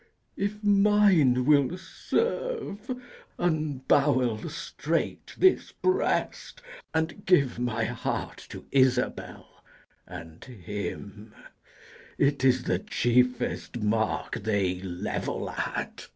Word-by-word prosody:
If 210 Hz, +2 st, -3 dB
mine 200 Hz, -11 st, +4 dB
will 145 Hz, +3 st, +3 dB
serve, 445 Hz, -, -3 dB, 0.5 s
unbowel 140 Hz, -7 st, +1 dB
straight -, -, -3 dB
this 375 Hz, -1 st, +3 dB
breast, 380 Hz, +5 st, -1 dB, 0.3 s
And 160 Hz, +5 st, -2 dB
give 140 Hz, -10 st, +3 dB
my 115 Hz, -2 st, -1 dB
heart 120 Hz, +1 st, -3 dB
to -, -, -9 dB
Isabel 130 Hz, -2 st, 0 dB, 0.5 s
and 80 Hz, -2 st, -10 dB
him: 105 Hz, -1 st, -7 dB, 0.8 s
It 140 Hz, -1 st, +2 dB
is 130 Hz, -1 st, +4 dB
the 90 Hz, -, 0 dB
chiefest 125 Hz, +3 st, 0 dB
mark 110 Hz, +1 st, 0 dB
they 100 Hz, -4 st, 0 dB
level 90 Hz, -2 st, -3 dB
at. -, -, -4 dB
130 Hz, 90 wpm, -27 LUFS, 110-180 Hz, 0.8 s, mine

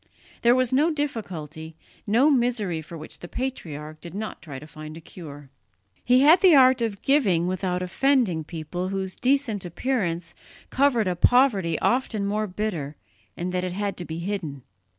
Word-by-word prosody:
There 240 Hz, +1 st, +5 dB
was 255 Hz, -1 st, +1 dB
no 295 Hz, +5 st, +4 dB
difficulty, 180 Hz, -, -4 dB, 0.3 s
no 245 Hz, +9 st, +4 dB
misery 235 Hz, -, +1 dB
for 165 Hz, +2 st, -10 dB
which 155 Hz, -, -9 dB
the 175 Hz, -, -8 dB
patriarch 155 Hz, -, -5 dB
did 170 Hz, +1 st, -9 dB
not 215 Hz, +1 st, -5 dB
try 145 Hz, -5 st, -8 dB
to 140 Hz, -, -10 dB
find 155 Hz, 0 st, -10 dB
a -, -, -8 dB
cure. 145 Hz, -5 st, -11 dB, 0.5 s
He 250 Hz, +1 st, +4 dB
had 320 Hz, +5 st, +7 dB
the 365 Hz, -5 st, +7 dB
art 260 Hz, -2 st, +6 dB
of 215 Hz, -4 st, -2 dB
giving 205 Hz, -, +3 dB
without 180 Hz, 0 st, -1 dB
offending 210 Hz, -, +1 dB
people 165 Hz, +3 st, -5 dB
whose 190 Hz, -1 st, -3 dB
decent 255 Hz, -6 st, +1 dB
appearance 175 Hz, -4 st, -2 dB, 0.4 s
covered 255 Hz, -6 st, +2 dB
a 180 Hz, -, 0 dB
poverty 200 Hz, -, +3 dB
often 235 Hz, -5 st, +1 dB
more 210 Hz, +2 st, -1 dB
bitter 180 Hz, -7 st, -3 dB, 0.4 s
in 180 Hz, +1 st, -3 dB
that 180 Hz, 0 st, -1 dB
it 180 Hz, -1 st, -3 dB
had 200 Hz, +1 st, -2 dB
to 175 Hz, -, -5 dB
be 160 Hz, 0 st, -6 dB
hidden. 170 Hz, -7 st, -4 dB
190 Hz, 170 wpm, -25 LUFS, 165-250 Hz, 0.5 s, had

